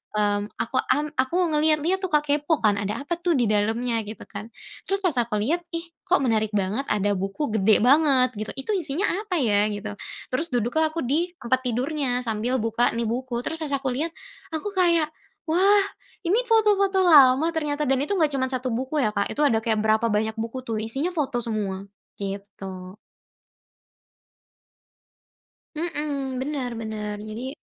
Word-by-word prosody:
mmm, 205 -1 +2 0.2
aku 235 - -3
mmm, 295 +1 0
aku 260 +6 +1 0.2
ngelihat-lihat 310 +4 +2
tuh, 375 - -1
Kak. 300 -1 +2
Kepo 295 +2 +1
kan, 205 -1 +3
"Ada 210 +7 -3
apa 345 - -1
tuh 340 -4 +2
di 240 - +2
dalamnya?" 225 +3 +1
Gitu 215 - -8
kan. 215 +2 -8 0.4
Terus 390 0 +1
pas 340 - +3
aku 230 -2 -2
lihat, 325 +10 +1
ih 335 +1 -3 0.2
kok 370 0 +4
menarik 220 -3 +1
banget, 205 +7 0
ada 205 -1 +1
buku 195 +7 -3
gede 215 0 +4
banget 270 -1 +5
gitu. 215 - -3
Itu 270 +10 -3
isinya 340 +1 0 0.2
apa 405 -5 -2
ya 210 -5 +2
gitu. 205 0 -5 0.4
Terus 320 +6 +1
duduklah 245 +7 +1
aku 330 - -2
di 320 +8 +1
tempat 255 +2 +1
tidurnya 250 +1 0
sambil 230 +3 -1
buka 225 +2 +2
nih 235 0 -1
buku. 245 0 -3
Terus 320 - -3
pas 310 - -3
aku 270 - -2
lihat, 320 +5 0 0.4
aku 320 +6 -2
kayak, 335 -4 +3 0.4
“Wah! 390 +4 +4 0.4
ini 400 +8 +3
foto-foto 410 -3 +3
lama 285 -2 +7
ternyata.” 300 -1 -1
Dan 270 0 +2
itu 405 - -2
nggak 310 -4 +3
cuman 260 -1 0
1 255 0 -2
buku 260 +5 -2
ya, 215 - +2
Kak. 200 - 0
Itu 295 - -2
ada 225 -5 +3
kayak 220 -1 +1
berapa 220 +1 +2
banyak 220 +1 0
buku 230 +3 -5
tuh, 225 -1 -2
isinya 270 +10 0
foto 285 -7 -1
semua 205 -4 -3 0.4
gitu. 195 -2 -6 2.8
Mhm, 290 -5 -2
bener 270 -3 -3
bener 210 -1 -4
jadi 250 +6 -5
260 Hz, 170 wpm, -24 LUFS, 220-310 Hz, 2.8 s, lama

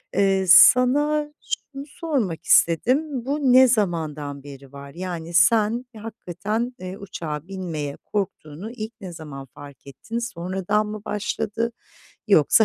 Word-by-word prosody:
Eee, 195 -1 +2
sana 295 +8 +6 0.2
şunu 275 0 -5
sormak 275 - -3
istedim: 255 - +2
Bu 285 +3 -1
ne 260 0 +8
zamandan 155 - -1
beri 140 -1 -12
var? 140 0 -10
Yani 170 -2 -6
sen 220 +7 +3
hakikaten, 215 +2 -4
eee, 185 +1 -7
uçağa 165 -5 -6
binmeye 165 -7 -5
korktuğunu 195 -1 -4
ilk 225 -1 -7
ne 180 -3 -7
zaman 140 -4 -9
fark 140 -2 -13
ettin? 220 - -6
Sonradan 190 0 -2
mı 210 -1 -6
başladı 210 +2 -2 0.6
yoksa 200 +3 +5
195 Hz, 125 wpm, -23 LUFS, 160-235 Hz, 0.6 s, ne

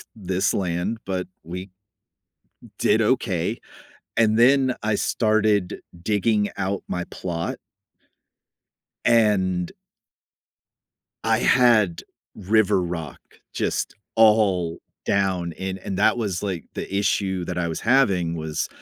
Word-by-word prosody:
this 95 -3 -1
land, 90 +4 -1
but 95 -2 -3 0.2
we 90 +4 -7 1.1
did - - +3
okay. - - 0 0.6
And 110 -1 +3
then 130 +1 +4
I 110 0 +1
started 110 -3 +1 0.2
digging 105 +1 +1
out 95 0 -2
my 90 0 -3
plot 85 -2 -4 1.5
and 95 -6 +2 1.6
I 110 0 +3
had 115 -9 +4 0.3
river 105 -1 +2
rock 85 -5 -5 0.4
just - - -2 0.2
all 100 -7 +3 0.3
down 95 -4 0
in 95 +2 -5
And 95 0 -5
that 110 - +4
was, 100 -6 -2
like, 95 -5 -3
the - - -6
issue 95 -2 0
that 90 - -4
I 85 - 0
was 80 - -4
having 100 -10 +2
was 80 -1 -3
95 Hz, 110 wpm, -23 LUFS, 90-110 Hz, 1.6 s, then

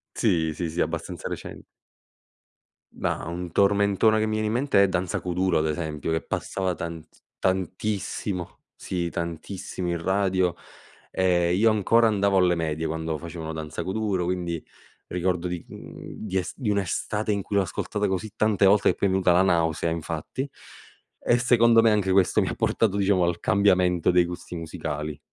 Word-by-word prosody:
Sì, 80 -2 +1
sì, 85 +1 -3
sì, 85 +2 -5
abbastanza - - -2
recen - - -7 1.3
Ma - - -2
un 85 0 -5
tormentone 100 +2 +3
che 110 - +1
mi 110 - -1
viene 110 0 0
in 110 - -1
mente, 125 -5 +3
è 100 - +4
Danza 90 -1 -1
Kuduro 90 0 0
ad 80 0 +1
esempio, 75 0 -3
che 80 0 0
passava 95 -2 -2
tant 85 -2 -6 0.3
tantissimo 95 0 -2 0.2
sì 85 -2 -3
tantissimo 85 +2 -5
in 85 -1 -2
radio, 95 -1 +1 0.6
ehm, 90 -2 +2
io 110 +2 +5
ancora 115 +2 +4
andavo 100 -2 +2
alle 90 -1 +4
medie 80 -1 -2
quando 80 0 -2
facevano 80 -1 -6
Danza 80 -1 -5
Kuduro, 95 -2 -1
quindi 85 -2 -2 0.4
ricordo 90 0 -1
di 90 -1 -4
mhmm, 110 - -9
di 95 0 -1
es 90 - -2
di 125 -7 -3
un'estate 105 +2 -1
in 100 - 0
cui 100 - -5
l'ho 100 - +4
ascoltata 105 +3 -2
così 95 +3 -2
tante 110 -3 +2
volte 100 +1 +5
che - - +1
poi 100 - +1
m'è 95 - 0
venuta 90 -2 +3
la 90 - +5
nausea 85 -3 +1
infatti, 80 - -4 0.7
e 120 - +2
secondo 120 -2 +5
me 115 - +5
anche 100 -3 +1
questo, 95 -1 +4
mi - - 0
ha - - -4
portato 105 -4 +1
diciamo 100 -2 +3
al 85 0 0
cambiamento 90 -3 +3
dei 90 0 +5
gusti 90 0 -7
musicali. 80 -3 -5
90 Hz, 170 wpm, -25 LUFS, 85-100 Hz, 1.3 s, io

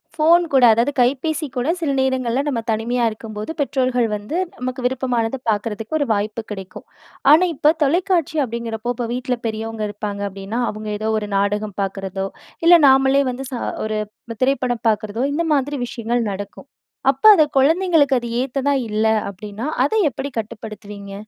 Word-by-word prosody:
Phone 330 +3 +5
கூட, 265 - +5
அதாவது 235 +6 +1
கைப்பேசி 285 +5 +1
கூட, 250 +3 -1
சில 295 -3 0
நேரங்கள்ல 260 -1 +1
நம்ம 240 -5 -1
தனிமையா 235 +3 0
இருக்கும்போது, 215 +2 -7
பெற்றோர்கள் 255 -3 +1
வந்து 210 +11 -4 0.2
நமக்கு 255 +1 -4
விருப்பமானத 250 -1 0
பாக்குறதுக்கு 220 +6 -2
ஒரு 285 - +1
வாய்ப்பு 210 +2 -2
கிடைக்கும். 190 -2 -8 0.5
ஆனா, 320 +4 +7
இப்போ 295 +2 +4
தொலைக்காட்சி 340 +1 +1
அப்படிங்கிறப்போ, 235 0 -4
இப்போ 235 0 -3
வீட்ல 250 0 -2
பெரியவங்க 220 0 -4
இருப்பாங்க 205 -1 -5
அப்டின்னா, 195 +4 -5
அவுங்க 215 0 -7
ஏதோ 215 +1 -2
ஒரு 210 -1 -6
நாடகம் 205 0 -1
பாக்குறதோ, 195 0 -3 0.4
இல்ல 345 +1 +9
நாமளே 270 +1 +5
வந்து 265 +2 -6
ச 255 - -3 0.3
ஒரு 215 0 -2 0.4
திரைப்படம் 255 -3 0
பாக்குறதோ 215 +3 -1
இந்த 335 +3 0
மாதிரி 285 +1 0
விஷயங்கள் 235 0 -2
நடக்கும். 200 +7 -8 0.4
அப்ப 270 - -15
அது 310 - +5 0.2
குழந்தைங்களுக்கு 315 -2 +3
அது 240 - -5
ஏத்ததா 275 +2 0
இல்ல 215 +1 0 0.3
அப்டின்னா, 210 +6 -7 0.2
அத 290 - -2 0.2
எப்படி 270 +3 -5
கட்டுப்படுத்துவீங்க? 210 -2 -8
240 Hz, 150 wpm, -20 LUFS, 215-275 Hz, 0.5 s, இல்ல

